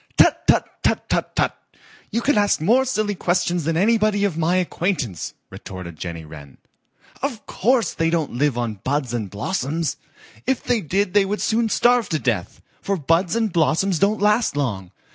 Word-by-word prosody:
"Tut, - - +4
tut, - - +4
tut, - - 0
tut, - - -1
tut! - - +2 0.6
You 235 - -1
can 290 - +2
ask 205 -1 +3
more 235 +11 +3
silly 215 -5 0
questions 175 -3 0
than 165 0 0
anybody 215 +1 +2
of 190 -6 -1
my 165 +2 +1
acquaintance," 175 - -2 0.2
retorted 90 -3 -8
Jenny 85 -1 -6
Wren. 75 -3 -12 0.6
"Of 255 -6 -3
course 235 0 +1
they 165 0 0
don't 165 -3 -1
live 135 0 +1
on 115 -4 -3
buds 135 -3 -1
and 110 -5 -3
blossoms. 145 - -2 0.5
If 265 -1 0
they 245 -3 +1
did 185 +3 -1
they 205 -1 +5
would 205 +2 -2
soon 225 0 +1
starve 240 -1 +3
to 160 - 0
death, 115 -11 -2 0.2
for 200 0 -1
buds 165 +4 +1
and 225 -5 0
blossoms 170 +2 +2
don't 205 +2 +2
last 210 -2 +2
long. 100 -10 -2
175 Hz, 175 wpm, -22 LUFS, 135-210 Hz, 0.6 s, they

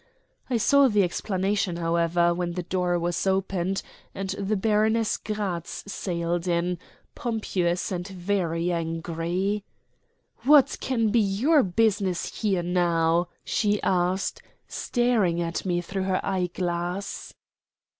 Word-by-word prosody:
I 245 - +2
saw 280 +4 +5
the 210 -4 +3
explanation, 190 0 -1
however, 170 0 +2
when 175 0 -2
the 180 0 -3
door 180 0 0
was 175 +2 -1
opened 190 -1 0 0.3
and 195 0 -4
the 200 +2 -1
Baroness 220 +2 +2
Gratz 200 -6 -4
sailed 170 -1 -2
in, 175 0 0 0.3
pompous 195 -9 -1
and 180 0 -3
very 180 -3 -1
angry. 170 +4 -2 0.8
"What 290 -1 +5
can 230 -4 +1
be 235 - +3
your 225 +10 +3
business 195 -2 0
here 195 -5 +1
now?" 170 -1 +2 0.2
she 210 -2 +1
asked, 185 +1 0 0.3
staring 230 -9 +1
at 170 +2 -2
me 175 -1 +1
through 190 +2 -3
her 185 - 0
eyeglass. 180 0 -2
185 Hz, 115 wpm, -26 LUFS, 175-205 Hz, 0.8 s, saw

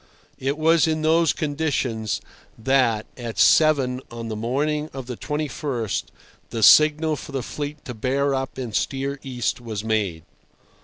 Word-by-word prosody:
It 140 +3 -1
was 160 +1 +4
in 155 -1 -1
those 165 +1 +4
conditions 140 -8 -2 0.4
that, 120 -3 +2
at 120 -3 -6
seven 135 -5 +4
on 115 -1 -6
the 110 - -3
morning 150 +7 -1
of 135 -2 -6
the 125 0 -5
21st, 145 - -3 0.4
the 115 -2 -3
signal 155 +5 +6
for 145 - -9
the 135 -2 -2
fleet 145 +2 -6
to 125 - -5
bear 135 +5 0
up 135 0 -3
and 120 -5 -5
steer 135 +1 -1
east 125 -2 -2
was 110 -3 -5
made. 105 -7 -1
135 Hz, 150 wpm, -23 LUFS, 115-150 Hz, 0.4 s, signal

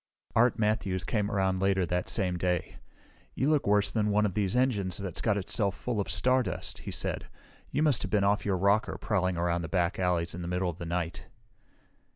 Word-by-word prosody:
Art 120 +1 +4
Matthews 105 -4 0
came 105 -1 -1
around 95 -3 +1
later 95 -1 +2
that 90 +1 -2
same 95 -5 +1
day. 90 0 -1 0.6
"You 140 +4 +1
look 150 -7 +1
worse 105 0 +3
than 105 -2 +1
one 105 +1 +3
of 100 - -1
these 100 +2 0
engines 110 -8 +1
that's 95 -4 -5
got 110 -3 +1
itself 100 +1 0
full 120 -4 -3
of - - -5
stardust," 130 0 0
he - - -7
said. - - -3 0.4
"You 150 - 0
must 150 -5 +3
have 105 - -3
been 105 -1 +2
off 100 +1 +2
your 100 -2 0
rocker, 100 +6 +2
prowling 90 -4 0
around 85 -1 -1
back 90 -1 0
alleys 90 -2 0
in 90 - -6
the 85 - -5
middle 90 0 0
of 85 - -15
the 85 - -5
night!" 85 0 -3
100 Hz, 200 wpm, -29 LUFS, 90-105 Hz, 0.6 s, Art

